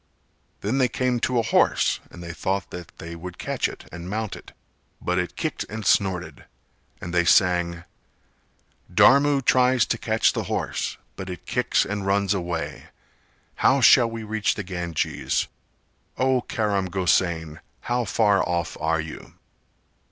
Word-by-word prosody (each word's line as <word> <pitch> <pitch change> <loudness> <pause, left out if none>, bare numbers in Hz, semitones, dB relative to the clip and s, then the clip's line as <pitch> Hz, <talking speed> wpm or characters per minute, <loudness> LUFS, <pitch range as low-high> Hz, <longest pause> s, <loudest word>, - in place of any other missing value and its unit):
Then 115 +7 0
they 130 - +4
came 125 -1 0
to 125 +1 0
a 115 - +3
horse - - +2
and 85 - -11
they 85 -1 -6
thought 95 +2 -2
that 90 -2 -8
they 85 +1 -8
would 90 +1 -8
catch - - -1
it - - -12
and 85 +1 -8
mount 110 0 -3
it, - - -13 0.5
but 90 +1 0
it 90 - -3
kicked - - -2
and 110 -1 -6
snorted; 95 -2 0 0.5
and 85 - -7
they 85 0 +3
sang: 85 -1 +3 1.1
"Dharmu 135 +8 +5
tries 125 -2 +4
to - - -2
catch - - +2
the - - -3
horse: - - -2 0.2
But 95 - -7
it 90 - -8
kicks 125 0 +1
and 105 0 -3
runs 100 0 +1
away. 85 -3 -4 0.7
How 135 - +4
shall 120 -1 +6
we 115 0 -6
reach 110 0 0
the 105 - -4
Ganges? 85 -3 -2 0.7
O 130 -1 +2
Karam 100 -5 -1
Gosain, 85 -3 0 0.2
how 120 0 -1
far 105 -2 +2
off 85 -2 -1
are 80 +1 +1
you?" 80 0 -8
95 Hz, 150 wpm, -24 LUFS, 85-115 Hz, 1.1 s, shall